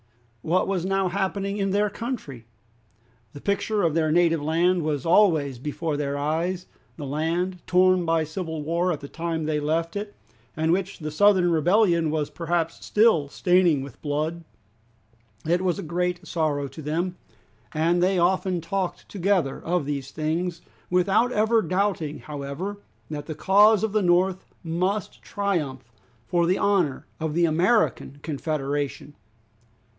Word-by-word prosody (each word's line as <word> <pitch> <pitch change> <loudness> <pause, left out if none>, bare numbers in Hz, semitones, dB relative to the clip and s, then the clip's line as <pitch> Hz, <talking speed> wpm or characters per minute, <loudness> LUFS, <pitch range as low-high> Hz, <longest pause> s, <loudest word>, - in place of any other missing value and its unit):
What 180 +3 +1
was 190 -3 -1
now 195 0 +1
happening 200 +1 -2
in 195 -1 0
their 205 +1 +1
country? 185 - -6 0.9
The 145 - -9
picture 200 +3 0
of 165 -3 +2
their 160 -1 +1
native 165 -1 +3
land 170 +4 +2
was 150 -4 -2
always 160 - +3
before 150 +3 -3
their 145 -1 -2
eyes, 165 +5 -1 0.3
the 150 - -6
land 165 +6 -1
torn 185 0 +4
by 165 -1 +1
civil 160 -1 -5
war 170 +4 0
at 155 - -3
the 140 - -7
time 165 +1 -3
they 155 -1 0
left 165 +4 -1
it, 205 0 -5 0.4
and 160 +1 +1
which 190 +2 -1
the 155 -1 -5
Southern 185 +1 +4
rebellion 170 0 +3
was 150 -1 -1
perhaps 165 -1 -2
still 210 -10 +3
staining 175 -3 +3
with 140 - -11
blood! 155 +3 -2 1.0
It 175 +2 +2
was 180 -3 0
a - - -5
great 175 +2 -2
sorrow 155 -5 -1
to 155 - -10
them, 170 +5 -2 0.5
and 170 +3 +1
they 185 +1 +2
often 180 +1 +1
talked 185 +2 -3
together 185 -8 0
of 175 -3 0
these 140 -2 -3
things, 165 +3 -2 0.3
without 195 +7 +3
ever 220 0 +3
doubting 180 -4 -1
however 150 +8 -5 0.3
that 145 -1 -5
the 155 - -5
cause 205 +4 +5
of 220 - 0
the 215 0 +2
North 185 +1 +2 0.2
must 180 +5 -2
triumph, 150 -12 -3 0.3
for 170 +8 +1
the 185 - +2
honor 180 -10 +1
of 160 -1 -2
the 170 0 +4
American 170 - +1
Confederation. 145 -1 -3
170 Hz, 150 wpm, -25 LUFS, 155-190 Hz, 1.0 s, cause